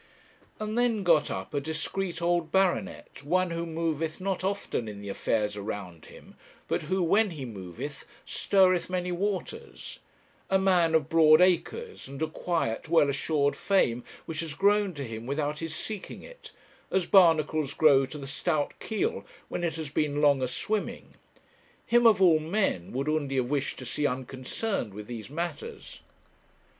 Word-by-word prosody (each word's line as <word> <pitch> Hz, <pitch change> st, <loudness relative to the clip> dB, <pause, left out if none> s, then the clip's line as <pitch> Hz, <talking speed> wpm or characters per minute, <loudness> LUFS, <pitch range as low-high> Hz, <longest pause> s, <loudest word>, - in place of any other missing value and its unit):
And 215 Hz, 0 st, -3 dB
then 230 Hz, -4 st, +1 dB
got 165 Hz, -4 st, +4 dB
up 95 Hz, +6 st, -5 dB
a 145 Hz, -, 0 dB
discreet 165 Hz, +3 st, -3 dB
old 170 Hz, -2 st, +1 dB
baronet, 190 Hz, -4 st, 0 dB
one 180 Hz, +4 st, +1 dB
who 170 Hz, 0 st, -3 dB
moveth 160 Hz, 0 st, -2 dB
not 185 Hz, -1 st, -2 dB
often 195 Hz, -, -2 dB
in 105 Hz, -1 st, -7 dB
the 100 Hz, 0 st, -7 dB
affairs 105 Hz, +1 st, -1 dB
around 100 Hz, -5 st, -6 dB
him, -, -, -15 dB, 0.3 s
but -, -, 0 dB
who, 185 Hz, +4 st, 0 dB
when 205 Hz, +6 st, +3 dB
he 150 Hz, -7 st, -6 dB
moveth, 105 Hz, -, -7 dB, 0.2 s
stirreth 185 Hz, -3 st, +2 dB
many 180 Hz, -1 st, -2 dB
waters; 200 Hz, -, -4 dB, 0.5 s
a 195 Hz, -, +4 dB
man 180 Hz, -4 st, +3 dB
of 155 Hz, -3 st, +2 dB
broad 155 Hz, -1 st, +6 dB
acres, 185 Hz, -, +1 dB
and 135 Hz, 0 st, -8 dB
a -, -, +1 dB
quiet, 160 Hz, -5 st, -2 dB
well 160 Hz, -4 st, +4 dB
assured 145 Hz, 0 st, 0 dB
fame 125 Hz, -12 st, +1 dB, 0.2 s
which 160 Hz, -1 st, -5 dB
has 160 Hz, -3 st, -4 dB
grown 200 Hz, -1 st, +2 dB
to 140 Hz, -, -4 dB
him 115 Hz, -1 st, -7 dB
without 145 Hz, +2 st, -2 dB
his 165 Hz, -1 st, -4 dB
seeking 205 Hz, +4 st, -6 dB
it, -, -, -13 dB, 0.4 s
as 190 Hz, -2 st, +1 dB
barnacles 155 Hz, -6 st, +4 dB
grow 140 Hz, -4 st, +5 dB
to 150 Hz, -, -8 dB
the 140 Hz, -, -7 dB
stout 145 Hz, +2 st, -1 dB
keel 230 Hz, -, -2 dB, 0.3 s
when -, -, -3 dB
it 170 Hz, -2 st, -1 dB
has 160 Hz, -3 st, -5 dB
been 145 Hz, 0 st, 0 dB
long 145 Hz, -2 st, +4 dB
a 130 Hz, -, +1 dB
swimming; 210 Hz, -, -3 dB, 0.7 s
him, 240 Hz, 0 st, +5 dB
of 215 Hz, -4 st, +5 dB
all 170 Hz, -5 st, +6 dB
men, 160 Hz, -, -1 dB
would 135 Hz, +3 st, -2 dB
Undy 150 Hz, -3 st, 0 dB
have 130 Hz, 0 st, 0 dB
wished 145 Hz, -1 st, -1 dB
to 130 Hz, -, -8 dB
see 145 Hz, +4 st, 0 dB
unconcerned 130 Hz, -, -3 dB
with 105 Hz, 0 st, -7 dB
these 115 Hz, -1 st, -7 dB
matters. 175 Hz, -, -6 dB
160 Hz, 165 wpm, -28 LUFS, 140-185 Hz, 0.7 s, broad